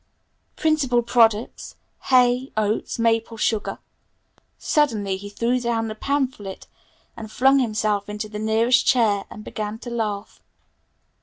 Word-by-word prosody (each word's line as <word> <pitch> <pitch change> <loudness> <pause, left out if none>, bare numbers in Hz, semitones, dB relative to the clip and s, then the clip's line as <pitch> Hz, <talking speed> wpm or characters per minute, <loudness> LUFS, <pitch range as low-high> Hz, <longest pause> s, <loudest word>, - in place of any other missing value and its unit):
"Principal 275 -7 +1
products 230 -2 +1 0.3
hay, 250 0 +3
oats, 215 0 -1
maple 230 0 0
sugar 220 -1 -1 0.5
" - - -40
Suddenly 220 -10 0
he 200 +2 -8
threw 235 +4 0
down 230 -2 -1
the - - -4
pamphlet 250 -5 -3 0.5
and 220 -1 -9
flung 270 +3 +4
himself 215 -4 -1
into 210 +1 -4
the 210 0 -7
nearest 225 +3 +3
chair 215 -6 +2
and 210 - -10
began 210 0 -5
to 240 +1 -9
laugh. 215 -3 -4
225 Hz, 130 wpm, -23 LUFS, 210-245 Hz, 0.5 s, flung